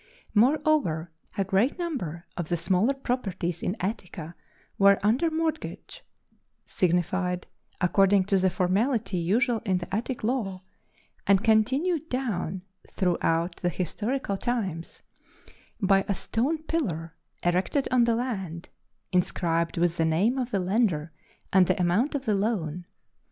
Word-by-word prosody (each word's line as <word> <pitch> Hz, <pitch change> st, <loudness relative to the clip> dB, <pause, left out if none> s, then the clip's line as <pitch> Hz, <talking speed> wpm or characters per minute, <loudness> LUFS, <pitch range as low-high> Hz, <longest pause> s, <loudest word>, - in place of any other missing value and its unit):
Moreover, 230 Hz, -, +2 dB, 0.3 s
a 195 Hz, -, +2 dB
great 195 Hz, -, +1 dB
number 195 Hz, -, -4 dB
of 175 Hz, -3 st, -4 dB
the 175 Hz, -, +1 dB
smaller 185 Hz, +10 st, +2 dB
properties 195 Hz, -10 st, -2 dB
in 185 Hz, -, -2 dB
Attica 180 Hz, -5 st, -4 dB, 0.5 s
were 200 Hz, 0 st, +6 dB
under 245 Hz, +11 st, +3 dB
mortgage, 315 Hz, -1 st, -3 dB, 0.6 s
signified 180 Hz, +1 st, 0 dB, 0.3 s
according 195 Hz, +2 st, +4 dB
to 195 Hz, 0 st, +2 dB
the 185 Hz, 0 st, +3 dB
formality 200 Hz, +4 st, 0 dB
usual 225 Hz, +7 st, +2 dB
in 190 Hz, -5 st, +1 dB
the 180 Hz, +2 st, -4 dB
Attic 240 Hz, +3 st, -3 dB
law, 210 Hz, -6 st, -1 dB, 0.6 s
and 195 Hz, +1 st, +4 dB
continued 275 Hz, +10 st, +2 dB
down 200 Hz, -8 st, -2 dB, 0.3 s
throughout 170 Hz, -2 st, +1 dB
the 175 Hz, -, 0 dB
historical 205 Hz, -, -2 dB
times 195 Hz, -9 st, -3 dB, 0.8 s
by 195 Hz, -2 st, +3 dB
a 200 Hz, -, 0 dB
stone 295 Hz, -, -1 dB
pillar 170 Hz, -, -2 dB, 0.3 s
erected 180 Hz, +11 st, +1 dB
on 250 Hz, -2 st, +5 dB
the 235 Hz, -1 st, +2 dB
land, 190 Hz, -9 st, -4 dB, 0.4 s
inscribed 170 Hz, -2 st, 0 dB
with 170 Hz, 0 st, +1 dB
the 165 Hz, -, +2 dB
name 195 Hz, +11 st, +2 dB
of 250 Hz, -1 st, -2 dB
the 200 Hz, -, 0 dB
lender 180 Hz, -5 st, +1 dB, 0.4 s
and 185 Hz, -2 st, +6 dB
the 185 Hz, -, +1 dB
amount 185 Hz, -, +2 dB
of 275 Hz, -1 st, -3 dB
the 215 Hz, -, +2 dB
loan. 185 Hz, -5 st, -1 dB
195 Hz, 130 wpm, -27 LUFS, 175-245 Hz, 0.8 s, were